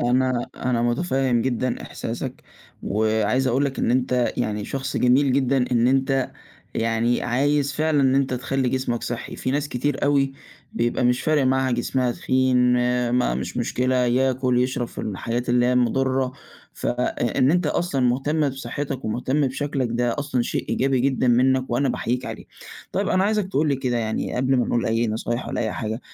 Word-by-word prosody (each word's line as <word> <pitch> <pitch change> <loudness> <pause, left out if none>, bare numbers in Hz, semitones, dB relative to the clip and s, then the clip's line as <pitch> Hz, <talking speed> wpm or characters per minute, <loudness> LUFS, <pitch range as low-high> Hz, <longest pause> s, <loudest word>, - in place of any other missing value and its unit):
أنا 125 0 +1
أنا 120 -2 0
مُتفهم 125 -2 +1
جدًا 130 -1 -1
إحساسك - - -6 0.4
وعايز 110 +5 +1
أقول 130 +3 +2
لك 135 -1 -3
إن - - +1
أنت 125 -1 +1
يعني 105 -3 -2
شخص 135 0 -4
جميل 130 +2 +3
جدًا 130 -1 +2
إن 120 0 +3
أنت 135 0 +1 0.4
يعني 115 +1 +1
عايز 140 +3 +1
فعلًا 155 0 +1
إن 135 -1 +3
أنت 135 -2 +1
تخلّي 130 +1 -1
جسمك 130 -2 -1
صحّي، 120 -1 -5
في 130 - -2
ناس 145 +1 -1
كتير 140 +3 -1
أوي 140 -1 +2 0.4
بيبقى 120 +1 0
مش 125 0 +2
فارق 155 -3 +2
معاها 130 0 +2
جسمها 120 +1 0
تخين 130 0 +1 0.5
ما 125 - +1
مش 65 - -4
مشكلة، 130 +1 0
ياكل، 125 0 +2
يشرب 125 -2 -2
في - - -12
المحلات 115 +5 -3
اللي 120 0 +3
هي 125 - +2
المضرة، 130 +1 +1 0.4
فإ - - -2 0.5
إن 130 +1 +4
أنت 175 +3 +2
أصلًا 170 -6 0
مهتم 140 +5 +1
بصحتك 135 +1 -5
ومهتم 130 +6 0
بشكلك 135 -1 -2
ده 120 +2 0
أصلًا 140 -4 0
شيء - - -3
إيجابي 135 -1 +1
جدًا 130 -1 +1
منّك 130 +1 +3
وأنا 135 +3 +1
باحييك 125 +2 -2
عليه. - - -7 0.5
طيّب - - 0
أنا 185 +1 +2
عايزك 210 -2 0
تقول 150 -2 +1
لي 140 - +1
كده 125 -2 -1
يعني 110 -1 -2
قبل 130 +1 +2
ما 125 - +1
نقول 120 - 0
أي 115 +1 +1
نصايح 115 +2 -3
ولا - - -2
أي 110 -2 -1
حاجة، 110 +1 -4
130 Hz, 175 wpm, -23 LUFS, 120-135 Hz, 0.5 s, إن